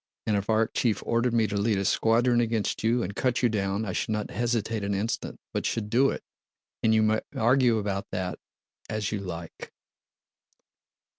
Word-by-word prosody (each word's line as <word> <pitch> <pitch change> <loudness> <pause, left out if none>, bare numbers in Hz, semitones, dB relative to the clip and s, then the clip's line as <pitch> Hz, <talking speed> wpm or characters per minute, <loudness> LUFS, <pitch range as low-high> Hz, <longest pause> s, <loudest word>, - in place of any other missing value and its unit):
And 105 - +1
if 100 0 -1
Arakchéev 110 0 +1
ordered 115 +1 +1
me 115 -1 +4
to 105 0 -3
lead 100 +1 +1
a 100 - -1
squadron 120 +4 +3
against 115 -3 -1
you 115 +2 +2
and 100 +2 -5
cut 125 -1 0
you 120 - +5
down, 100 0 -1
I 100 - -3
should - - -2
not 105 -1 -2
hesitate 115 -2 -1
an 100 0 -1
instant, 105 +4 -3
but - - -1
should 105 -2 -2
do 135 +4 +4
it.' - - -4 0.6
And 110 - +3
you 110 0 +4
may 110 0 +2
argue 120 0 +3
about 100 -2 -2
that 90 -1 -3 0.5
as 110 -2 -2
you 105 - -2
like!" 85 -3 -7
110 Hz, 180 wpm, -27 LUFS, 100-115 Hz, 0.6 s, you